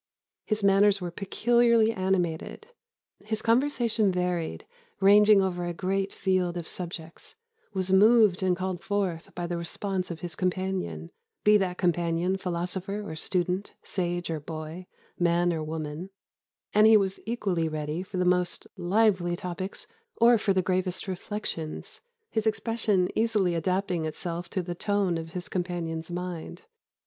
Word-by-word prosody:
His 215 -1 -1
manners 200 +1 +5
were 175 -2 -4
peculiarly 230 +4 +3
animated; 185 - -1 0.6
his 215 +1 -3
conversation 230 -4 +2
varied, 180 - -2 0.3
ranging 205 +1 +6
over 180 -2 -1
a 175 0 -3
great 195 +2 -1
field 185 -2 0
of 170 - -5
subjects, 170 -2 -7 0.4
was 185 0 0
moved 210 -1 +6
and 185 -1 +2
called 185 -1 -3
forth 195 -5 -2
by 175 - -3
the 175 0 -3
response 185 +2 -3
of 165 -2 -6
his 175 -2 -5
companion, 185 - -2 0.3
be 210 0 +6
that 185 -3 -1
companion 175 0 +1
philosopher 190 +3 -3
or 160 - -5
student, 180 +3 -1
sage 175 -2 -2
or 160 - -2
boy, 155 +4 -7 0.3
man 175 0 +3
or 160 -1 -2
woman; 155 +3 -5 0.6
and 215 +1 +6
he 220 0 +8
was 195 -2 -1
equally 190 -8 0
ready 155 +2 -3
for 185 0 -6
the 180 - +1
most 180 0 +1
lively 185 -1 +2
topics 180 +2 -5 0.3
or 235 0 +5
for 205 - +1
the 190 -1 +2
gravest 185 +1 -1
reflections 185 -4 -5 0.3
his 220 -1 0
expression 215 -3 +1
easily 215 -5 +2
adapting 180 0 0
itself 170 +2 -4
to 185 - -2
the 175 0 -4
tone 195 -2 0
of 165 0 -8
his 180 -1 -4
companion's 170 -3 -3
mind. 175 -1 -5
185 Hz, 145 wpm, -27 LUFS, 175-200 Hz, 0.6 s, he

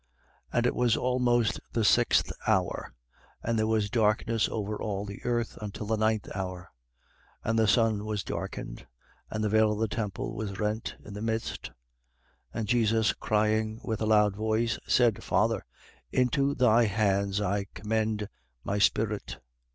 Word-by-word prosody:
And 120 0 +1
it - - +2
was 120 -2 +2
almost 125 -2 +2
the 115 - +1
sixth - - +4 0.2
hour: - - 0 0.5
and 115 -1 0
there 110 - +2
was 110 -2 +1
darkness 110 -1 +2
over 105 -1 -3
all 100 -1 -2
the 100 -1 -9
earth 120 -1 -1
until 105 0 -5
the 110 +2 +1
ninth 110 0 +1
hour. 90 -1 -5 0.7
23:45. - - -1
And 115 - +2
the 110 - +4
sun 110 -2 +3
was 105 -2 -2
darkened, - - -6 0.4
and 110 0 -3
the 105 - +1
veil 110 0 +4
of - - -4
the 110 +1 +1
temple 105 -2 -3
was 100 -3 -4
rent 105 +1 -2
in 105 - -9
the 105 - -6
midst. 110 0 -2
23:46. - - -18 0.8
And 110 - -2
Jesus 110 -1 +3
crying 110 +1 0
with 110 -2 -3
a 110 - +1
loud 105 -2 +4
voice, 110 +2 0
said: 120 -4 +3
Father, - - +1 0.5
into 135 +3 +2
thy 120 -1 +5
hands 100 -1 +1
I 100 0 -1
commend 110 +1 -1 0.4
my 100 +1 -1
spirit. 100 - +1
110 Hz, 160 wpm, -28 LUFS, 105-115 Hz, 0.8 s, thy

